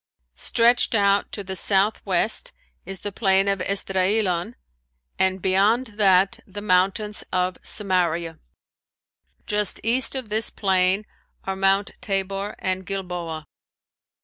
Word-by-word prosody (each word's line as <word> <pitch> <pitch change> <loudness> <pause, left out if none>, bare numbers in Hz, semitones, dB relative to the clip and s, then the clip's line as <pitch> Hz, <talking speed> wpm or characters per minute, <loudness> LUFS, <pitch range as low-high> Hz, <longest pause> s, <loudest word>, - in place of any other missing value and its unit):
Stretched 235 - +2
out 200 -1 +2
to 205 - -4
the 190 0 -6
southwest 200 - +1 0.3
is 195 -1 -7
the 205 - -4
Plain 195 -1 +2
of 195 -2 0
Esdraelon, 195 +1 0 0.6
and 190 -1 +1
beyond 210 +5 +2
that 190 -1 +4
the 195 +2 -8
mountains 205 +2 +1
of 180 0 0
Samaria. 170 -5 -1 1.1
Just 210 -1 0
east 240 +3 +1
of 255 -5 -4
this 215 +1 +2
plain 190 +1 +1 0.4
are 190 - -3
Mount 195 +1 +1
Tabor 195 0 -2
and 185 0 -2
Gilboa. 180 -5 -5
195 Hz, 115 wpm, -23 LUFS, 185-210 Hz, 1.1 s, that